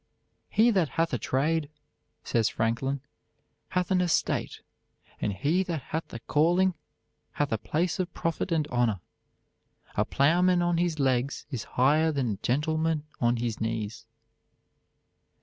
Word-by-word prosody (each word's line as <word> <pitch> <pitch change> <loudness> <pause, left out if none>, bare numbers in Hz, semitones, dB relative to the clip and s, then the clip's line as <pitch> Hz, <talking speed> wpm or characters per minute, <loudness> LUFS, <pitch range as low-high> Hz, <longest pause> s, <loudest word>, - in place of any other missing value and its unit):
_" - - -46 0.5
"He 225 +3 +4
that 185 -8 +2
hath 165 -2 +1
a 125 - 0
trade," 150 +6 0 0.5
says 115 -2 +1
Franklin, 115 +5 -1 0.7
"hath 180 0 -1
an 185 -1 +4
estate; 175 -2 0 0.6
and 105 - 0
he 145 - +1
that 170 -7 -3
hath 160 +1 -2
a - - -5
calling 175 +8 +3 0.6
hath 145 -1 -1
a 110 - 0
place 170 - -1
of 180 -1 -1
profit 165 +3 -2
and 155 -3 +1
honor. 120 -6 +1 1.0
A - - +3
plowman 175 +5 +3
on 175 -1 +1
his 175 -2 0
legs 130 0 0
is 125 -5 -4
higher 150 +5 +4
than 135 -6 0
a 100 - -3
gentleman 155 - 0 0.2
on 120 0 +2
his 115 -2 -3
knees." 110 -1 -3
150 Hz, 145 wpm, -28 LUFS, 120-170 Hz, 1.0 s, He